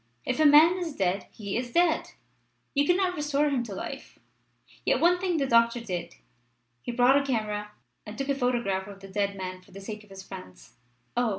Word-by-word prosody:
If 255 - -1
a 310 - +7
man 320 +5 +7
is 330 -5 -4
dead 190 +1 0
he 200 -2 -5
is 245 +1 -2
dead. 340 -2 +2 0.6
You 285 0 +2
cannot 360 +1 +2
restore 295 -1 +1
him 265 -3 +1
to 205 -4 -7
life. - - -7 0.7
Yet - - +2
one 355 +1 +4
thing 360 -2 0
the 280 - +1
doctor 235 -1 +4
did. 180 -7 -5 0.7
He - - -4
brought 250 +3 +4
a - - -4
camera 210 -5 -2 0.3
and 210 +1 -9
took 275 +1 -3
a - - +4
photograph 240 -8 0
of 200 -1 -10
the 195 - -10
dead 200 0 -1
man 185 -1 -6
for - - -23
the 195 - -10
sake 210 +2 -7
of 210 - -20
his 195 0 -10
friends." 185 - -11 0.4
"Oh! 240 -1 +2
235 Hz, 205 wpm, -27 LUFS, 200-285 Hz, 0.7 s, a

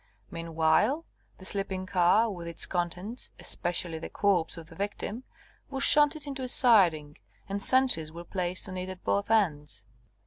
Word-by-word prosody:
Meanwhile, 165 - +1 0.3
the 190 - -9
sleeping 190 -1 -2
car, 190 +5 +3
with 175 -3 -7
its 170 -1 -1
contents, 180 +6 -4
especially 175 -2 -1
the - - -7
corpse 180 -5 0
of 165 - -9
the 165 - -15
victim, 205 +5 -5 0.4
was 270 0 -1
shunted 295 0 +4
into 275 -2 -6
a 255 - -3
siding, 175 - +4 0.3
and 200 +1 -4
sentries 250 -12 +3
were 170 +1 -9
placed 180 +1 -1
on 185 -1 -6
it 185 +1 -5
at 185 -1 -9
both 200 +1 -1
ends. 150 - 0
185 Hz, 160 wpm, -28 LUFS, 170-225 Hz, 0.4 s, shunted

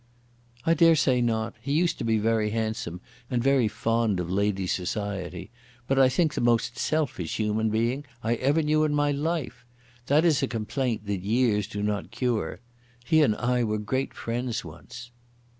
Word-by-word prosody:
"I 165 - +4
dare 165 0 +5
say 130 -5 +2
not. 110 -2 0
He 140 +4 -2
used 170 +3 +1
to - - -3
be 115 -1 +2
very 110 0 +1
handsome, 110 -5 -3 0.3
and 120 -2 0
very 135 -4 +3
fond 115 -2 0
of 90 0 -3
ladies' 95 -1 0
society, 95 0 -4 0.3
but, 135 +2 +1
I 130 -1 +6
think, 155 +4 +1
the - - -2
most 120 0 +2
selfish 135 - -1
human 110 +1 +1
being 120 +6 0 0.2
I 115 +1 +1
ever 145 +6 +2
knew 155 +1 +2
in 150 -1 +1
my 145 0 +2
life. 150 -2 -2 0.4
That 150 +4 +4
is 155 -3 +3
a 135 - +1
complaint 115 -1 -2
that 100 -2 -2
years 105 0 +1
do 105 0 -5
not 105 -1 -2
cure. 120 -2 -2 0.4
He 160 +2 +4
and 110 -8 +3
I 125 +1 0
were 110 -1 0
great 130 +6 -2
friends 120 +1 -3
once." 120 0 -11
120 Hz, 175 wpm, -26 LUFS, 105-135 Hz, 0.4 s, I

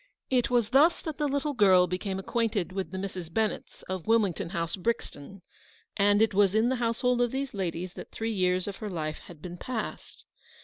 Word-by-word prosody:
It 250 -2 +2
was 240 -3 +2
thus 300 +6 +5
that 315 -3 -5
the 295 - +2
little 285 +1 -1
girl 190 -6 +6
became 185 +2 -3
acquainted 210 -2 -1
with 190 0 -3
the 190 - -6
Misses 185 -3 -5
Bennett 220 +5 -2
of 185 0 -4
Wilmington 205 -7 +2
House, 170 0 -2
Brixton; 195 -4 -4 0.5
and 205 +1 +4
it 220 - +1
was 200 0 +4
in 220 +2 +4
the 260 - 0
household 240 +1 +1
of 240 - +3
these 270 +2 -3
ladies 185 -2 -3
that - - -9
three 225 0 -3
years 185 -1 +1
of 200 - -5
her 215 - -5
life 155 -4 -3
had 160 -4 -13
been 175 -1 -7
passed. 235 +2 -6
205 Hz, 195 wpm, -28 LUFS, 180-235 Hz, 0.5 s, girl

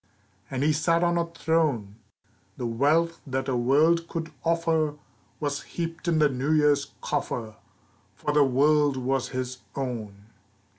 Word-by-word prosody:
And 135 0 -2
he 155 +1 +3
sat 165 +3 +2
on 170 0 +2
a 170 - 0
throne! 155 -11 0 0.6
The 125 - -3
wealth 150 +8 +1
that 135 0 -2
a 130 - 0
world 155 +7 +3
could 165 -1 -5
offer 165 -2 +1 0.4
Was 145 -1 -2
heaped 165 0 -5
in 165 -2 +2
the 155 -1 +5
New 135 +3 -1
Year's 145 -2 +2
coffer, 110 -3 -3 0.6
For 150 - -2
the 150 -1 +6
world 145 +1 +3
was 130 0 -1
his 130 -1 -4 0.2
own. 110 -7 -5
145 Hz, 145 wpm, -26 LUFS, 130-165 Hz, 0.6 s, the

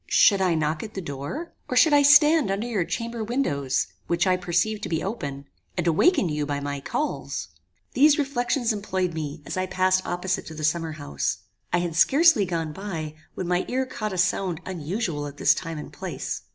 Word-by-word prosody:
Should 200 -2 +5
I 180 -3 +2
knock 155 0 0
at 215 -1 -8
the - - -2
door? 150 - -6 0.2
or 250 - 0
should 295 +4 +6
I 290 - +7
stand 295 -2 +6
under 200 +4 -1
your 220 -7 0
chamber 230 +4 -4
windows, 145 - 0 0.2
which 170 +2 +1
I 185 -1 +3
perceived 180 +4 0
to - - -4
be 160 -1 -1
open, 140 -10 -4 0.3
and 175 - 0
awaken 185 - +3
you 150 -2 -1
by 145 -1 -2
my 145 0 -4
calls? 300 - -3 0.4
"These 290 +2 +5
reflections 245 -4 0
employed 190 -4 -2
me, 155 -1 -5
as - - -5
I 185 0 0
passed 185 0 +2
opposite 180 +1 -2
to 160 - -8
the 155 - -6
summer 160 +1 0
house. 120 -11 -3 0.3
I - - +3
had 170 -2 -3
scarcely 280 - +5
gone 165 -3 -3
by, 165 -5 -5 0.2
when 185 - -4
my 180 +1 +1
ear 260 +1 0
caught 215 -5 -4
a 185 - -4
sound 180 -1 +1
unusual 170 -3 -3
at 145 0 -10
this 150 - +5
time 165 -1 -5
and 150 - -8
place. - - -5
185 Hz, 200 wpm, -25 LUFS, 155-230 Hz, 0.4 s, I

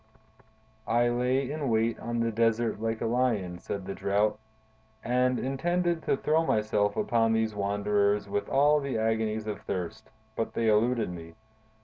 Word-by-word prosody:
"I 120 +1 +3
lay 125 +3 0
in 150 -3 -2
wait 115 0 +1
on 120 0 -2
the 115 0 0
desert 115 0 +1
like 115 0 -2
a - - 0
lion," 115 -7 0
said 95 +1 -5
the 100 - -4
Drought, 105 +2 0 0.6
"and 125 +1 +1
intended 170 +6 0
to - - +2
throw 155 +3 +2
myself 105 -6 +1
upon 115 -1 +2
these 110 -1 0
wanderers 100 0 +1
with 100 +1 -2
all 145 +2 +4
the 140 -4 -3
agonies 110 -1 0
of 105 -2 -5
thirst, 95 +5 -5 0.3
but 115 - -2
they 115 -1 +2
eluded 115 0 +2
me. 85 -1 -9
115 Hz, 155 wpm, -28 LUFS, 105-125 Hz, 0.6 s, all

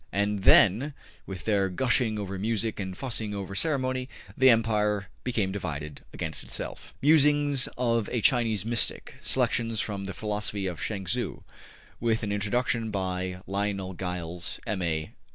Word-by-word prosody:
And 100 0 0
then, 120 +8 +6 0.3
with 95 -3 -7
their 100 -3 +2
gushing 115 +2 +1
over 100 -2 -4
music 110 +1 0
and 95 -2 -4
fussing 110 -5 -2
over 100 -1 -5
ceremony, 130 -1 +1 0.3
the 130 0 +6
empire 105 -4 +2
became 110 -6 0
divided 75 -6 -5
against - - -4
itself. - - -5
``Musings 145 -2 +4
of 115 -3 +1
a 120 - +1
Chinese 110 -4 +3
Mystic.'' 115 0 -1
Selections 115 -2 +1
from 100 -2 -2
the 95 -2 -5
Philosophy 105 -1 -2
of 90 -3 -4
Chuang 100 -3 -2
Tzu. 85 - -2 0.6
With 115 -1 +1
an 105 - -1
Introduction 110 +3 0
by 95 -2 -2
Lionel 100 -1 -2
Giles, 90 -1 -4
M.A. 85 -6 -1
105 Hz, 140 wpm, -28 LUFS, 95-115 Hz, 0.6 s, then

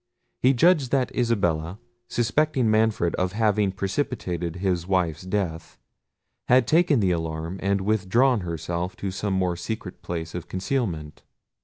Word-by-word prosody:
He 130 +2 +4
judged 155 -1 +4
that 130 -2 0
Isabella, 95 -8 0 0.3
suspecting 125 0 +1
Manfred 110 -5 +2
of 90 0 -1
having 105 -2 +2
precipitated 95 - -3
his 90 -2 -1
wife's 90 -5 0
death, 90 -4 -3 0.7
had 125 0 +5
taken 155 -3 +3
the 95 -2 +2
alarm, 80 +2 -3
and 100 0 +1
withdrawn 110 +5 +2
herself 85 +1 -4
to 100 - -4
some 100 +1 -2
more 90 -2 +1
secret 90 0 -6
place 85 -2 -5
of 90 - -6
concealment. 95 - -3
95 Hz, 135 wpm, -25 LUFS, 85-115 Hz, 0.7 s, had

